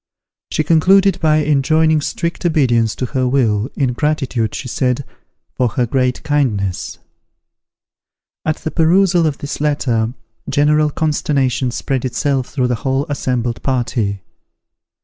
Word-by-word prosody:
She 155 - 0
concluded 190 +5 +4
by 155 -1 +3
enjoining 155 +2 +2
strict 170 +3 -3
obedience 120 - +2
to 125 - -3
her 130 0 -1
will, 120 -4 +1
in 130 -3 0
gratitude, 135 -6 -1
she 130 - -5
said, 130 +2 -1 0.5
for 125 - +1
her 120 +2 0
great 125 +1 -1
kindness. 105 -11 -1 1.5
At 155 - 0
the 160 - -5
perusal 175 0 +3
of 150 - -2
this 145 0 -6
letter 125 -6 0 0.3
general 150 +1 +3
consternation 140 -4 0
spread 130 +1 -2
itself 135 0 -1
through 130 -3 -1
the 125 - +1
whole 135 0 0
assembled 125 -4 -2
party. 115 -6 -1
135 Hz, 130 wpm, -17 LUFS, 125-155 Hz, 1.5 s, concluded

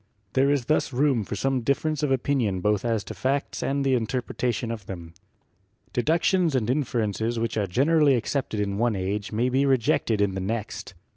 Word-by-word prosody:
There 135 +1 +3
is 140 -4 +1
thus 155 0 +1
room 130 -3 +2
for 105 - -5
some 135 +2 0
difference 140 +4 0
of 150 -3 0
opinion 125 -7 +1
both 105 +1 +1
as 115 -3 0
to - - -7
facts 130 +8 -1
and 140 0 0
the 135 - +3
interpreta 125 +1 -1
tion 115 0 -3
of 110 -4 -7
them. 85 -3 -8 0.8
Deductions 165 +5 +2
and 115 -5 +1
inferences 115 -4 -1
which 115 -1 -1
are 105 -2 0
gener 145 - +2
ally 145 -2 +6
accepted 120 -2 -1
in 100 0 -1
one 120 -2 +2
age 100 +2 -3
may 115 +3 +1
be 130 +2 +2
rejected 120 -4 +2
in 100 -2 +2
the 95 - -3
next. 105 -1 -4
120 Hz, 195 wpm, -25 LUFS, 105-135 Hz, 0.8 s, ally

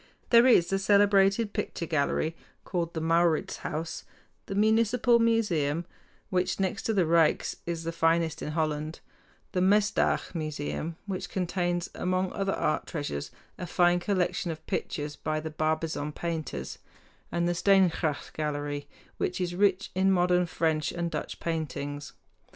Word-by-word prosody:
There 235 +1 +7
is 205 -9 +6
the 195 - +2
celebrated 200 +1 +4
picture 205 -5 -3
gallery 155 +1 0 0.3
called 170 -2 -3
the 160 - -2
Mauritshuis, 165 -1 0 0.4
the 195 - -4
Municipal 230 +3 +3
Museum 175 -9 +1 0.5
which, 180 +1 0
next 190 -2 -1
to 225 - +1
the 185 -4 +3
Ryks, 165 -1 +2
is 170 -1 -3
the 165 - -2
finest 165 -1 +1
in 150 - -4
Holland, 155 0 -2 0.5
the 180 - 0
Mesdag 205 +1 +2
Museum, 155 0 -3
which 195 -3 -4
contains 175 -1 -1
among 185 0 -1
other 195 -1 -1
art 155 - -1
treasures 145 - -4 0.3
a 180 - -4
fine 175 0 +3
collection 180 -2 0
of 160 -1 -6
pictures 145 0 -3
by 155 0 -2
the 160 0 -5
Barbizon 155 -1 -1
painters, 165 -2 -4 0.5
and 170 0 0
the 175 - +1
Steengracht 175 -5 +2
Gallery, 145 -1 -3 0.3
which 180 - -2
is 175 -1 -1
rich 195 +1 +2
in 190 +1 +3
modern 180 -1 +3
French 160 -2 0
and 170 -1 -3
Dutch - - -4
paintings. 145 -3 -4
170 Hz, 140 wpm, -28 LUFS, 155-190 Hz, 0.5 s, There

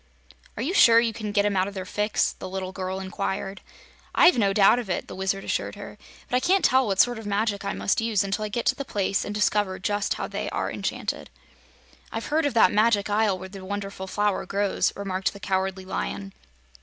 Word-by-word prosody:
"Are 225 - -2
you 325 +8 -1
sure 230 - +7
you 230 -1 +1
can 215 -1 -5
get 205 0 +2
'em 205 -1 +1
out 185 0 +2
of 200 - -8
their 190 -1 -4
fix?" 210 +2 0
the 185 - -8
little 185 0 -4
girl 190 0 -4
inquired. 195 +1 -4 0.5
"I've 360 - +7
no 200 -4 +2
doubt 200 +4 +5
of 230 -5 -6
it," 180 - -2
the - - -8
Wizard 190 +1 -2
assured - - -2
her. - - -10 0.3
"But - - -1
I - - +4
can't 375 +8 +2
tell 260 -1 +4
what 195 -2 -1
sort 245 -2 +4
of 220 - -8
magic 205 0 0
I - - -2
must 205 - 0
use 225 -3 +1
until 200 +2 -2
I 210 - -3
get 235 +3 -3
to - - +3
the 280 - -4
place 200 -6 -1
and 205 - -5
discover 205 -2 +1
just 205 +1 -1
how - - -3
they - - -4
are - - -2
enchanted." - - -4 0.8
"I've - - -4
heard 315 -1 +3
of 265 - -4
that 220 - +6
Magic 210 -1 +3
Isle 205 -2 +2
where 190 +1 -9
the 195 -1 -10
Wonderful 195 -1 -5
Flower 205 0 0
grows," 200 0 +1
remarked 190 -1 -2
the 200 - -11
Cowardly 190 0 -2
Lion. 195 +1 -4
200 Hz, 225 wpm, -25 LUFS, 190-220 Hz, 0.8 s, sure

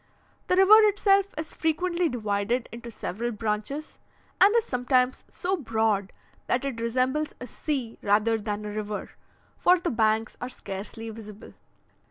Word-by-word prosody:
The 365 - +3
river 385 +3 +8
itself 400 -1 +3
is 310 0 -5
frequently 340 +2 0
divided 220 +1 -1
into 235 0 -8
several 230 +1 -4
branches, 220 +7 -3 0.4
and 395 +2 +8
is 465 - +3
sometimes 250 0 +1
so 375 +1 -1
broad 220 - 0 0.4
that 250 +3 0
it 245 -4 -3
resembles 255 +6 0
a 250 - -6
sea 255 -4 -4
rather 215 +2 +2
than 210 0 -4
a 210 - -4
river, 210 0 -4 0.5
for 360 0 +4
the 345 - -2
banks 220 -1 +1
are 250 - -3
scarcely 205 0 -7
visible. 215 -1 -11
240 Hz, 145 wpm, -26 LUFS, 215-310 Hz, 0.5 s, river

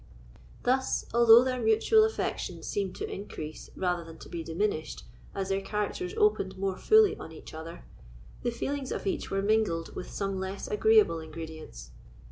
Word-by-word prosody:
Thus, 260 +1 +1
although 235 0 +8
their 255 -1 -1
mutual 225 - +4
affection 445 0 -2
seemed 195 -3 -2
to - - -4
increase 155 -6 -7
rather 180 -2 -1
than 165 0 -11
to - - -12
be 170 - -4
diminished 165 -1 -2 0.3
as 195 -1 -2
their 195 0 0
characters 210 - -3
opened 415 - +2
more 195 0 -1
fully 435 - +5
on - - -9
each 160 - -11
other, 165 +2 -8 0.6
the - - 0
feelings 270 +3 -3
of - - -4
each 195 - -2
were 195 0 -1
mingled 205 -6 +1
with - - -6
some 195 -1 -3
less 190 +1 -4
agreeable 430 - +4
ingredients. 155 - -9
195 Hz, 160 wpm, -29 LUFS, 165-245 Hz, 0.6 s, although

